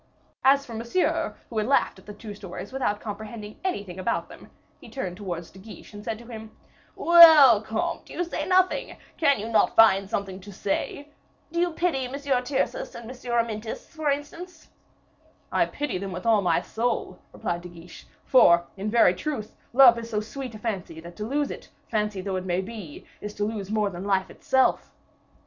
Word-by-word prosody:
As 275 Hz, +1 st, +4 dB
for 235 Hz, -, -9 dB
Monsieur, 235 Hz, +11 st, -1 dB
who 225 Hz, -, -3 dB
had 215 Hz, -, -1 dB
laughed 275 Hz, -7 st, +2 dB
at 190 Hz, -, -21 dB
the 210 Hz, -, -7 dB
two 215 Hz, -2 st, -8 dB
stories 200 Hz, +4 st, -9 dB
without 225 Hz, -6 st, -1 dB
comprehending 215 Hz, 0 st, -8 dB
anything 200 Hz, -, -3 dB
about 185 Hz, -, -2 dB
them, -, -, -13 dB, 0.3 s
he -, -, -13 dB
turned 185 Hz, -10 st, -5 dB
towards 175 Hz, -4 st, -6 dB
De 190 Hz, -, -15 dB
Guiche, 215 Hz, +2 st, -12 dB
and 205 Hz, 0 st, -9 dB
said 220 Hz, 0 st, -3 dB
to 235 Hz, -, -13 dB
him, 220 Hz, -2 st, -9 dB, 0.5 s
"Well, 315 Hz, -10 st, +8 dB
comte, 335 Hz, +11 st, -3 dB
you 350 Hz, -, -2 dB
say 340 Hz, -, -4 dB
nothing; 370 Hz, 0 st, +2 dB, 0.2 s
can 285 Hz, -4 st, +3 dB
you 215 Hz, -, -4 dB
not 230 Hz, -1 st, +2 dB
find 195 Hz, -3 st, +5 dB
something 195 Hz, -2 st, -3 dB
to 200 Hz, +2 st, -11 dB
say? 205 Hz, +9 st, -3 dB, 0.4 s
Do 340 Hz, -, -2 dB
you 350 Hz, 0 st, +2 dB
pity 320 Hz, -7 st, 0 dB
M. 250 Hz, -, -10 dB
Tyrcis 280 Hz, -, -1 dB
and 235 Hz, -1 st, -9 dB
M. -, -, -9 dB, 0.2 s
Amyntas, 230 Hz, -2 st, -2 dB
for 315 Hz, -3 st, -2 dB
instance?" 310 Hz, +4 st, -5 dB, 0.8 s
"I -, -, +2 dB
pity 285 Hz, -10 st, -3 dB
them 195 Hz, 0 st, -5 dB
with 180 Hz, 0 st, -6 dB
all 225 Hz, -3 st, +4 dB
my 175 Hz, -3 st, +2 dB
soul," 230 Hz, -5 st, -2 dB
replied 175 Hz, 0 st, -3 dB
De 180 Hz, -, -9 dB
Guiche; 170 Hz, 0 st, -13 dB, 0.2 s
"for, 170 Hz, -9 st, +6 dB
in 200 Hz, +2 st, -3 dB
very 230 Hz, -5 st, +5 dB
truth, 240 Hz, -, -5 dB, 0.2 s
love 245 Hz, -2 st, +7 dB
is 230 Hz, 0 st, -8 dB
so 210 Hz, -, -1 dB
sweet 235 Hz, +2 st, -7 dB
a -, -, -6 dB
fancy, 195 Hz, -7 st, -4 dB
that 170 Hz, +1 st, -11 dB
to 210 Hz, -, -4 dB
lose 285 Hz, +3 st, -1 dB
it, -, -, -9 dB, 0.2 s
fancy 210 Hz, -3 st, -1 dB
though 190 Hz, 0 st, -3 dB
it 185 Hz, -, -5 dB
may 180 Hz, 0 st, 0 dB
be, 195 Hz, -6 st, -9 dB, 0.2 s
is 210 Hz, 0 st, -7 dB
to 205 Hz, -, -2 dB
lose 210 Hz, -3 st, -4 dB
more 210 Hz, -2 st, 0 dB
than 180 Hz, +2 st, -7 dB
life 190 Hz, -2 st, 0 dB
itself. 265 Hz, -1 st, +1 dB
220 Hz, 195 wpm, -25 LUFS, 195-270 Hz, 0.8 s, Well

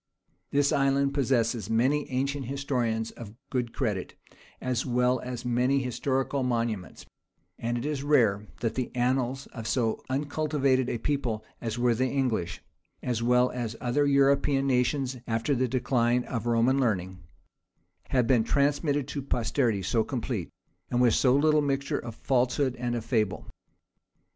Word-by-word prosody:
This 140 Hz, 0 st, +2 dB
island 140 Hz, 0 st, +2 dB
possesses 120 Hz, -4 st, +1 dB
many 130 Hz, +6 st, +1 dB
ancient 135 Hz, 0 st, -2 dB
historians 125 Hz, -5 st, -1 dB
of 110 Hz, -2 st, -10 dB, 0.2 s
good 125 Hz, -3 st, -1 dB
credit, 105 Hz, -9 st, -2 dB, 0.4 s
as 125 Hz, -2 st, -1 dB
well 125 Hz, 0 st, +1 dB
as 125 Hz, -1 st, -6 dB
many 125 Hz, +3 st, +2 dB
historical 130 Hz, +2 st, -1 dB
monuments; 115 Hz, -6 st, -2 dB, 0.5 s
and 120 Hz, +1 st, -1 dB
it 120 Hz, -, -4 dB
is 150 Hz, -2 st, -2 dB
rare, 110 Hz, -8 st, +2 dB
that 115 Hz, -2 st, 0 dB
the 130 Hz, 0 st, -2 dB
annals 130 Hz, +2 st, 0 dB
of 115 Hz, -3 st, -6 dB
so 115 Hz, -1 st, 0 dB
uncultivated 140 Hz, -2 st, +1 dB
a -, -, -1 dB
people 115 Hz, -4 st, -2 dB, 0.2 s
as 115 Hz, -1 st, -3 dB
were 120 Hz, 0 st, +3 dB
the 130 Hz, +3 st, +1 dB
English, 120 Hz, -11 st, -1 dB, 0.4 s
as 120 Hz, -3 st, -1 dB
well 125 Hz, +1 st, +3 dB
as 120 Hz, -3 st, -3 dB
the -, -, -13 dB
other 145 Hz, +4 st, +2 dB
European 140 Hz, 0 st, +3 dB
nations 130 Hz, 0 st, +1 dB
after 115 Hz, +5 st, 0 dB
the 130 Hz, -1 st, +1 dB
decline 125 Hz, -1 st, +1 dB
of 120 Hz, -2 st, -4 dB
Roman 120 Hz, +3 st, +3 dB
learning, 95 Hz, -7 st, -1 dB, 0.9 s
have 125 Hz, -3 st, +2 dB
been 120 Hz, -2 st, +3 dB
transmitted 145 Hz, +2 st, +1 dB
to 140 Hz, -, -3 dB
posterity 120 Hz, -5 st, 0 dB
so 110 Hz, +4 st, +1 dB
complete, 120 Hz, -, -3 dB, 0.4 s
and 120 Hz, -, 0 dB
with 120 Hz, -3 st, +4 dB
so 125 Hz, +2 st, +4 dB
little 150 Hz, +1 st, +4 dB
mixture 140 Hz, -1 st, -1 dB
of 115 Hz, -2 st, -7 dB
falsehood 130 Hz, +1 st, +1 dB
and 120 Hz, 0 st, -2 dB
of 115 Hz, -2 st, -4 dB
fable. 110 Hz, -6 st, 0 dB
125 Hz, 150 wpm, -28 LUFS, 115-135 Hz, 0.9 s, with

